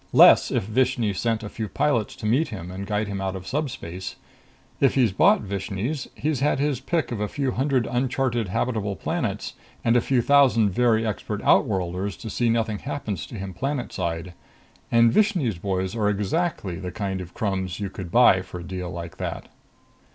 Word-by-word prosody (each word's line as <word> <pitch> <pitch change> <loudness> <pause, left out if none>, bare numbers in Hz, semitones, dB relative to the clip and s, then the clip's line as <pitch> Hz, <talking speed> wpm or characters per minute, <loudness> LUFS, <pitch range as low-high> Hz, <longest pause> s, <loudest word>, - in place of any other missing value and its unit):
Less, - - +8
if - - 0
Vishni 120 -1 +1
sent 115 +2 -1
a - - -4
few 110 +1 -5
pilots 120 -5 0
to - - -8
meet 130 +9 +2
him 90 -6 -7
and 95 +1 -6
guide 105 0 0
him 100 -1 -4
out 95 0 -2
of 95 -1 -7
subspace. 95 - -4 0.6
If 135 - +3
he's 125 -6 +4
bought 95 - +4
Vishni's, 100 - -3
he's 150 -2 -1
had 145 +2 +2
his 140 -2 0
pick 160 +2 -1
of 115 - -3
a 105 - 0
few 135 +3 -1
hundred 130 -2 +1
uncharted 120 -2 0
habitable 105 0 -1
planets - - -3 0.3
and 115 0 +3
a 120 - +5
few 125 -1 +1
thousand 130 -7 +5
very 115 +1 +2
expert 105 -1 -3
outworlders 95 0 +1
to 110 - -7
see 120 +2 +1
nothing 115 -2 0
happens 125 - -4
to - - -9
him 95 -2 -5
planetside. 90 - -3 0.6
And 115 -1 +5
Vishni's 175 - +2
boys 95 +1 -2
are 105 -2 +1
exactly 105 - -1
the 90 -1 -5
kind 95 -1 -3
of 90 -1 -10
crumbs 95 -3 -2
you 100 -2 -3
could 95 -3 -7
buy 95 -3 +6
for 90 -1 -8
a - - -8
deal 90 0 -5
like 85 -1 -7
that. - - -5
110 Hz, 185 wpm, -24 LUFS, 95-125 Hz, 0.6 s, Less